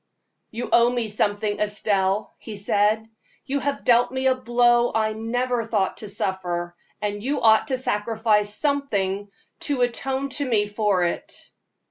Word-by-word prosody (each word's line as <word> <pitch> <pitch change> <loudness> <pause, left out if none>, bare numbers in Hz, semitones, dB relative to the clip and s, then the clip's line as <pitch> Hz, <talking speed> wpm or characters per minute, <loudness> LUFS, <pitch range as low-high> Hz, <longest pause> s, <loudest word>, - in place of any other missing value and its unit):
"You 235 +2 -5
owe 235 0 +6
me 240 -3 -2
something, 205 0 0
Estelle," 205 -1 0
he 215 -3 -8
said. 210 +2 +1 0.4
"You 280 +1 -1
have 280 +1 -2
dealt 240 0 +4
me 260 0 -2
a 260 - +5
blow 240 -1 +3
I 215 -1 +1
never 240 +2 -1
thought 210 -4 -1
to 210 - -7
suffer, 175 -3 -3 0.3
and 205 0 -2
you 275 +6 -1
ought 220 -1 +5
to 265 -2 0
sacrifice 215 -3 +1
something 205 -7 -1 0.4
to 275 -3 0
atone 265 +3 -1
to 285 +1 -2
me 210 -3 +3
for 205 -3 +1
it." 170 - -4
220 Hz, 150 wpm, -24 LUFS, 205-245 Hz, 0.4 s, owe